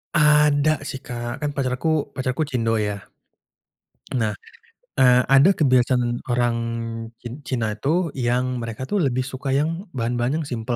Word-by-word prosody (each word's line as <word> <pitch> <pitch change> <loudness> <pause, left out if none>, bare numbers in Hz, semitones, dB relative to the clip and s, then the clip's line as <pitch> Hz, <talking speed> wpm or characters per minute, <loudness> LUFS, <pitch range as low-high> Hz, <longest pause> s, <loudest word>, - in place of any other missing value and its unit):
Ada 150 -1 +4
sih - - -4
Kak, 120 -1 -5
kan 150 - 0
pacarku 140 +3 0
pacarku 130 +2 -2
cindo 115 -3 0
ya. 105 -1 -2 1.2
Nah, 110 -3 0 0.7
eee, 125 -1 +6
ada 140 +8 +7
kebiasaan 125 -3 +2
orang 120 -1 +1 0.7
cin 120 +4 -7
Cina 115 -4 -1
itu, 155 - 0
yang 125 0 -1
mereka 115 +1 -5
tuh 200 +10 -1
lebih 130 -5 +1
suka 135 +1 -3
yang 165 +7 -1
bahan-bahan 120 +6 -1
yang - - -8
simpel 120 0 -2
130 Hz, 140 wpm, -23 LUFS, 120-145 Hz, 1.2 s, ada